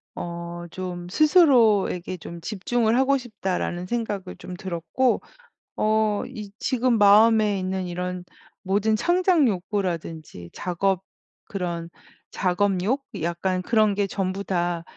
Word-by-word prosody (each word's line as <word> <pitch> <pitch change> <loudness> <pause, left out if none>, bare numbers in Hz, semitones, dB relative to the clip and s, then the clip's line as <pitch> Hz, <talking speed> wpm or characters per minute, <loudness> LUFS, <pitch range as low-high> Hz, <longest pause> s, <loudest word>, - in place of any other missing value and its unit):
어 170 0 -5 0.2
좀 180 -1 -6
'스스로에게 230 - +4
좀 170 +1 -9
집중을 220 +5 0
하고 275 +1 +3
싶다.'라는 190 -7 -3
생각을 205 -5 -3
좀 180 - -8
들었고 185 +6 -1 0.6
어 215 -1 +1
이 215 -6 -8
지금 250 -2 +1
마음에 210 0 +5
있는 185 0 -2
이런 180 0 -4 0.4
모든 205 +3 +1
창작 350 - +3
욕구라든지 170 - -4
작업 185 +1 -1 0.4
그런 170 -4 -4 0.4
작업욕? 200 +7 0 0.2
약간 175 +2 -1
그런 215 +1 +2
게 200 0 0
전부 195 0 -2
다 175 -3 -1
195 Hz, 235 characters per minute, -24 LUFS, 180-220 Hz, 0.6 s, 마음에